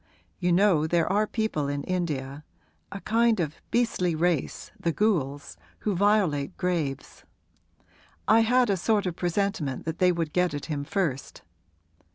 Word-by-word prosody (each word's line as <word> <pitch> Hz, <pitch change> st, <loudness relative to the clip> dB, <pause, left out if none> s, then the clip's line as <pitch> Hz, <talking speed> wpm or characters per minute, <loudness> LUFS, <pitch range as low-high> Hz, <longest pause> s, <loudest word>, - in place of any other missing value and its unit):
You 180 Hz, -1 st, +1 dB
know 175 Hz, -4 st, +3 dB
there 170 Hz, 0 st, +2 dB
are 210 Hz, +1 st, +2 dB
people 215 Hz, -12 st, -1 dB
in 140 Hz, 0 st, -3 dB
India 150 Hz, -6 st, -3 dB, 0.5 s
a 200 Hz, -, -7 dB
kind 230 Hz, -1 st, +2 dB
of 155 Hz, -3 st, -3 dB
beastly 205 Hz, -8 st, +1 dB
race, 165 Hz, -3 st, -1 dB
the 170 Hz, -, 0 dB
ghouls 150 Hz, -9 st, -1 dB, 0.2 s
who 210 Hz, -, 0 dB
violate 185 Hz, -7 st, +1 dB
graves. 165 Hz, -7 st, -3 dB, 1.0 s
I 220 Hz, +1 st, +6 dB
had 240 Hz, 0 st, +3 dB
a 195 Hz, -, +1 dB
sort 205 Hz, +2 st, +1 dB
of 180 Hz, -2 st, -2 dB
presentiment 175 Hz, -6 st, -2 dB
that 160 Hz, 0 st, -4 dB
they 180 Hz, -1 st, +5 dB
would 165 Hz, -3 st, -3 dB
get 180 Hz, -4 st, +1 dB
at 145 Hz, -, -5 dB
him 145 Hz, -3 st, -4 dB
first. 145 Hz, -7 st, -3 dB
175 Hz, 150 wpm, -26 LUFS, 150-205 Hz, 1.0 s, I